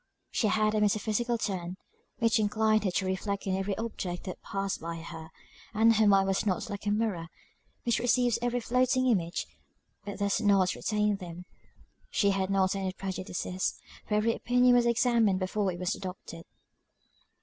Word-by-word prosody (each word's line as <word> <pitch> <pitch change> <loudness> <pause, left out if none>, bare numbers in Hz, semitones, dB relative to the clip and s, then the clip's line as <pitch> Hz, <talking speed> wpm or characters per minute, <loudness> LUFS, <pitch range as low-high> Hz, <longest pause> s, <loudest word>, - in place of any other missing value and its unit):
She 220 - +1
had 215 0 +2
a 215 - +1
metaphysical 215 +3 +1
turn, 185 -4 -3 0.4
which 230 -1 +2
inclined 215 0 +2
her - - +2
to 190 +1 -1
reflect 195 +2 -2
on 190 -1 0
every 195 +1 -2
object 195 -6 -4
that 185 - -7
passed 195 0 -3
by 165 +1 -4
her; 165 -1 -8 0.5
and 225 +1 +5
her 215 -1 +4
mind 195 -1 +5
was 195 0 +1
not 205 0 -1
like 200 +1 -6
a - - +3
mirror, 205 -6 -1 0.6
which 235 -2 +1
receives 245 -1 +2
every 245 0 0
floating 255 +2 +2
image, 180 -9 0 0.6
but 200 -1 -6
does 200 +2 0
not 195 -3 +3
retain 210 -1 0
them: 180 -2 -9 0.6
she 200 -1 +2
had 195 -1 -1
not 190 -1 +2
any 190 -1 -2
prejudices, 185 -1 -3 0.3
for 210 - 0
every 220 +2 +2
opinion 245 +2 +3
was 240 -1 +4
examined 235 -4 +3
before 190 +1 -1
it 175 - -6
was 180 0 -1
adopted. 180 -3 -8
200 Hz, 170 wpm, -29 LUFS, 185-225 Hz, 0.6 s, and